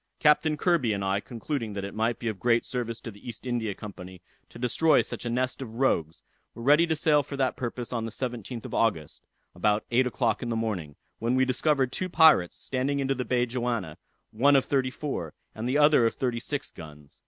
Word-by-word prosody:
Captain 150 0 +3
Kirby 150 - +2
and 100 -1 -2
I 95 +1 +1
concluding 115 0 -4
that 100 -1 -4
it 100 - -6
might 115 +2 0
be 120 - -5
of 105 -4 -3
great 120 +2 +2
service 120 -2 -4
to 115 - -7
the 100 - -17
East 115 - -9
India 115 -5 -2
Company 95 -3 -9 0.3
to - - -12
destroy 125 +6 +3
such - - -6
a - - -1
nest 130 +2 -1
of 115 -4 -7
rogues, 85 - 0 0.3
were 115 - -8
ready 150 +6 +5
to 160 - +1
sail 150 -1 +3
for 140 0 -7
that 130 -1 +1
purpose 120 0 -5
on 115 -2 -1
the - - -3
17th 120 -1 -5
of - - -7
August, 90 -10 0 0.3
about 105 +4 +1
eight 125 +2 +3
o'clock 120 -2 0
in 120 - -3
the 115 - -1
morning, 100 -10 -3 0.2
when 120 +2 0
we 130 0 +3
discovered 130 0 +1
two 185 +5 -3
pirates 160 - +5
standing 135 +2 -2
into 135 0 +1
the 130 -1 -3
bay 125 -1 +1
Johanna, 120 -9 -3 0.3
one 140 +6 +4
of 135 - +4
thirty 135 -3 +1
four, 130 - -5 0.2
and 115 +3 -4
the 135 - +2
other 145 -5 +5
of - - -3
thirty 120 -3 -1
six 145 +4 -4
guns. 75 -2 -13
120 Hz, 220 wpm, -27 LUFS, 110-135 Hz, 0.3 s, ready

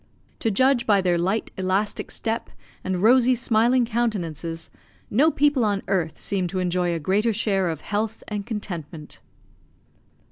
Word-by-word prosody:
To 225 - 0
judge 255 +4 +2
by 205 -2 +5
their 180 -2 +1
light 190 +6 -1
elastic 190 +3 -1
step 225 0 -3 0.3
and 185 0 -2
rosy 250 +2 +5
smiling 240 +1 +3
countenances, 170 - -3 0.4
no 280 +9 +4
people 290 -4 +2
on 205 -2 0
earth 175 -5 -1
seem 190 -3 -2
to 185 - -5
enjoy 180 -1 0
a - - -2
greater 200 +8 +1
share 195 -4 0
of 160 -2 -4
health 215 +2 -3
and 210 -1 -3
contentment. 170 -8 -6
205 Hz, 145 wpm, -24 LUFS, 180-230 Hz, 0.4 s, by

